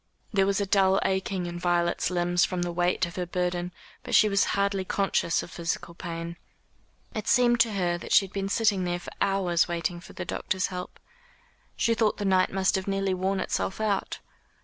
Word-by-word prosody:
There 195 -1 +3
was 200 0 +1
a 200 - 0
dull 195 -1 +3
aching 190 -1 -1
in 175 0 -5
Violet's 175 -1 +1
limbs 175 0 +1
from 180 -1 0
the 175 - -2
weight 175 +2 +1
of 170 +1 -9
her 180 -1 -2
burden, 180 0 -2 0.3
but - - -1
she 215 - +7
was 200 -1 +3
hardly 200 -1 +1
conscious 185 -3 0
of - - -11
physical 170 0 -3
pain. 170 -1 -6 0.8
It 215 - -4
seemed 240 -1 +4
to 225 -1 +3
her 175 -3 0
that - - -9
she 195 - +6
had 190 - -14
been 195 -1 -2
sitting 205 -3 +2
there 175 0 -1
for - - -10
hours 190 -4 +2
waiting 170 0 -2
for 175 - -13
the - - -5
doctor's 190 -2 -1
help. 180 0 -6 0.8
She 230 - +2
thought 220 -2 +1
the 205 - -3
night 185 -1 +3
must 190 -1 +1
have 190 - -5
nearly 195 -1 0
worn 190 +1 -1
itself 190 +1 -2
out. 210 -3 -1
185 Hz, 200 wpm, -27 LUFS, 175-195 Hz, 0.8 s, she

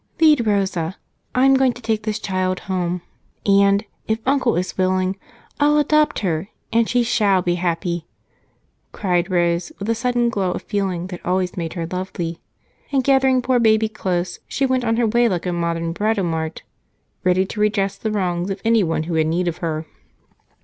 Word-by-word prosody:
"Lead 300 -8 +5
Rosa 190 -4 0 0.4
I'm 265 +2 +5
going 265 -2 +3
to 240 - -12
take 220 -1 0
this 215 -1 -2
child 185 -1 -1
home, 180 -2 -2 0.4
and 200 +1 +4 0.2
if 220 - +1
Uncle 265 -2 +2
is 180 +1 -2
willing, 185 0 +1 0.4
I'll 295 +1 +4
adopt 300 -1 +2
her, 170 -2 -1 0.3
and 230 -1 +3
she 245 -1 +2
shall 205 -6 +2
be 175 - +1
happy!" 170 -1 -1 0.9
cried 180 -2 0
Rose, 175 - +1
with 200 - -5
the 230 - +2
sudden 240 0 +1
glow 190 -5 -1
of - - -6
feeling 190 -4 -2
that 180 - -8
always 180 0 0
made 165 -2 -4
her 170 -2 -3
lovely. 175 -1 -4 0.5
And 270 -2 +2
gathering 265 -1 +3
poor 255 -1 +2
baby 220 -1 +3
close, 180 -4 -2
she 275 - 0
went 260 -1 +1
on 225 -1 +1
her 240 - +3
way 235 +2 +3
like 180 -2 -2
a 180 - -1
modern 170 -1 -1
Britomart, 170 -6 -1 0.6
ready 185 +1 +3
to 210 - -7
redress 205 -2 +1
the 220 - -3
wrongs 180 -3 -1
of 195 0 -3
any 230 0 +4
who 165 -1 -1
had 160 -1 +2
need 175 +3 0
of 170 -1 -2
her. 160 -2 -3
195 Hz, 175 wpm, -21 LUFS, 175-230 Hz, 0.9 s, Lead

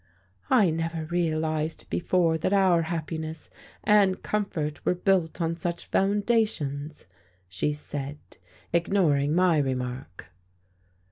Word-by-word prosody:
"I 190 -6 +5
never 165 0 -2
realized 155 -2 -1
before 175 -2 +2
that 185 - 0
our 190 -4 +4
happiness 160 -1 -5 0.3
and 205 -3 +3
comfort 175 -8 -2
were - - +1
built 180 -3 +1
on 165 -1 0
such 170 +1 -4
foundations;" 195 -8 0 0.4
she 95 +11 -1
said, 145 -1 -5 0.6
ignoring 165 -5 +2
my 180 -3 +4
remark. 125 - -4
165 Hz, 105 wpm, -26 LUFS, 150-185 Hz, 0.6 s, I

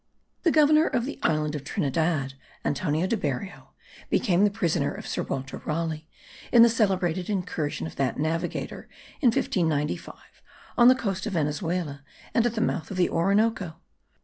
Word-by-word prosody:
The 340 - +3
Governor 305 0 +5
of 245 -3 0
the 285 - -6
island 150 -1 +1
of 145 -3 -4
Trinidad, 145 -1 -1 0.3
Antonio 155 +3 0
de 210 - +1
Berrio, 150 - -4 0.4
became 190 -4 +2
the 210 - +5
prisoner 170 -7 0
of - - -8
Sir - - -2
Walter 135 0 -4
Raleigh 160 -1 -3 0.4
in 235 -1 +8
the 235 - +7
celebrated 190 -5 0
incursion 175 - -2
of 80 - -8
that 135 -3 0
navigator, 160 +3 -3 0.3
in 270 - +4
1595, 160 -9 0 0.6
on 240 - +6
the 255 - +8
coast 195 -6 -3
of 210 - -3
Venezuela 150 -1 -2 0.3
and 230 +1 +3
at 235 - -3
the 220 - 0
mouths 185 -6 -1
of 195 - -5
the 180 - +3
Orinoco. 195 -1 +1
175 Hz, 160 wpm, -26 LUFS, 150-215 Hz, 0.6 s, in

